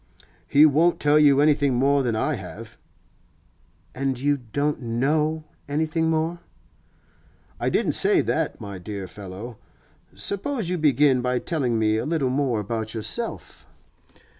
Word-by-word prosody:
'He 145 Hz, +2 st, +6 dB
won't 160 Hz, +4 st, +3 dB
tell 150 Hz, +1 st, +4 dB
you 140 Hz, -2 st, +5 dB
anything 145 Hz, -3 st, +3 dB
more 140 Hz, +3 st, +2 dB
than 120 Hz, -4 st, -1 dB
I 110 Hz, -, 0 dB
have.' -, -, -9 dB, 1.1 s
'And 135 Hz, -1 st, -2 dB
you 145 Hz, +2 st, +1 dB
don't 140 Hz, +5 st, -2 dB
know 150 Hz, +7 st, 0 dB, 0.3 s
anything 160 Hz, +2 st, 0 dB
more?' 160 Hz, +2 st, -1 dB, 1.2 s
'I -, -, 0 dB
didn't -, -, +1 dB
say -, -, +4 dB
that, -, -, -2 dB
my 100 Hz, -2 st, -8 dB
dear 100 Hz, 0 st, -6 dB
fellow. 100 Hz, +5 st, -9 dB, 0.6 s
Suppose 200 Hz, -2 st, -2 dB
you 180 Hz, -, -1 dB
begin 145 Hz, -3 st, +3 dB
by 125 Hz, 0 st, 0 dB
telling 125 Hz, -5 st, -1 dB
me 110 Hz, 0 st, +1 dB
a 110 Hz, -, -2 dB
little 150 Hz, -5 st, 0 dB
more 130 Hz, -4 st, 0 dB
about 110 Hz, +2 st, -4 dB
yourself? 230 Hz, -, -5 dB
140 Hz, 140 wpm, -24 LUFS, 115-155 Hz, 1.2 s, He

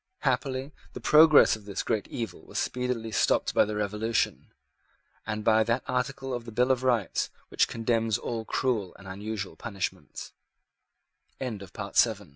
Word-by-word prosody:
Happily 135 Hz, +1 st, -1 dB, 0.2 s
the -, -, -6 dB
progress 155 Hz, -4 st, +7 dB
of 110 Hz, -2 st, -13 dB
this 100 Hz, -2 st, -3 dB
great 105 Hz, -3 st, -1 dB
evil 115 Hz, -7 st, -5 dB
was -, -, -9 dB
speedily 125 Hz, -3 st, -2 dB
stopped -, -, +2 dB
by -, -, +5 dB
the 105 Hz, 0 st, -4 dB
Revolution, 105 Hz, +2 st, -1 dB, 0.8 s
and 110 Hz, 0 st, -3 dB
by 110 Hz, 0 st, +4 dB
that 115 Hz, +1 st, 0 dB
article 135 Hz, +1 st, -2 dB
of 120 Hz, -1 st, -4 dB
the 115 Hz, -, -8 dB
Bill 125 Hz, +4 st, +2 dB
of 130 Hz, -1 st, +1 dB
Rights 120 Hz, -7 st, +1 dB, 0.2 s
which -, -, +2 dB
condemns 115 Hz, -1 st, 0 dB
all 115 Hz, -2 st, -4 dB
cruel 110 Hz, -5 st, -1 dB
and 100 Hz, -, -13 dB
unusual 100 Hz, +1 st, -5 dB
punis 100 Hz, -2 st, -5 dB
115 Hz, 140 wpm, -28 LUFS, 105-125 Hz, 0.8 s, progress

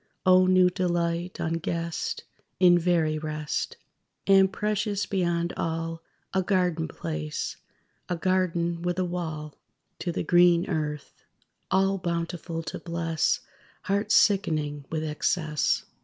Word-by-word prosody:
O 185 Hz, 0 st, +6 dB
new 185 Hz, -1 st, +5 dB
delight, 175 Hz, -1 st, -1 dB
unguessed, 165 Hz, 0 st, -2 dB, 0.4 s
In 175 Hz, -1 st, +6 dB
very 165 Hz, -3 st, +1 dB
rest! 155 Hz, -1 st, -3 dB, 0.5 s
And 195 Hz, -1 st, +5 dB
precious 210 Hz, 0 st, -1 dB
beyond 175 Hz, -2 st, 0 dB
all, 165 Hz, 0 st, -3 dB, 0.3 s
A 190 Hz, -, +2 dB
garden 180 Hz, -4 st, +1 dB
place, 75 Hz, -, -4 dB, 0.5 s
a 180 Hz, -, 0 dB
garden 170 Hz, -1 st, 0 dB
with 175 Hz, +1 st, -1 dB
a 185 Hz, -, +1 dB
wall! 160 Hz, -4 st, -4 dB, 0.5 s
To 175 Hz, -, -2 dB
the 170 Hz, -, -2 dB
green 175 Hz, -1 st, +5 dB
earth! 150 Hz, -4 st, -4 dB, 0.5 s
All 195 Hz, +1 st, +2 dB
bountiful 170 Hz, -1 st, -3 dB
to 155 Hz, -, -5 dB
bless 165 Hz, -2 st, 0 dB, 0.4 s
Hearts 200 Hz, +2 st, +1 dB
sickening 155 Hz, -8 st, +2 dB
with 160 Hz, -1 st, -2 dB
excess. 155 Hz, 0 st, 0 dB
170 Hz, 115 wpm, -27 LUFS, 160-185 Hz, 0.5 s, O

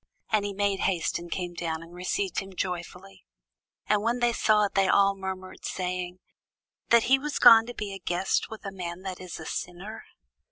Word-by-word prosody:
And 215 Hz, -2 st, +3 dB
he 205 Hz, -, -2 dB
made 200 Hz, 0 st, 0 dB
haste, 175 Hz, -4 st, 0 dB
and 170 Hz, 0 st, -9 dB
came 175 Hz, 0 st, -3 dB
down, 165 Hz, -2 st, -3 dB
and 165 Hz, +1 st, -14 dB
received 345 Hz, -, -2 dB
him 195 Hz, -1 st, -9 dB
joyfully. 180 Hz, +1 st, -5 dB, 0.6 s
And 210 Hz, -1 st, +2 dB
when 235 Hz, +3 st, +1 dB
they 240 Hz, -1 st, +2 dB
saw 215 Hz, -2 st, +3 dB
it, 200 Hz, -, -4 dB
they 195 Hz, -1 st, +3 dB
all 200 Hz, 0 st, +4 dB
murmured, 190 Hz, -1 st, -7 dB
saying, 180 Hz, -1 st, -3 dB, 0.7 s
That 235 Hz, -1 st, +6 dB
he 270 Hz, +2 st, +4 dB
was 295 Hz, +1 st, -3 dB
gone 225 Hz, 0 st, +8 dB
to 245 Hz, -, -7 dB
be 200 Hz, -2 st, -5 dB
guest 180 Hz, +2 st, 0 dB
with 220 Hz, -2 st, -9 dB
a 195 Hz, -, -4 dB
man 180 Hz, -1 st, -6 dB
that 185 Hz, -2 st, -5 dB
is 180 Hz, -2 st, -7 dB
a 160 Hz, -, -8 dB
sinner. 190 Hz, +8 st, -6 dB
195 Hz, 195 wpm, -27 LUFS, 180-210 Hz, 0.7 s, gone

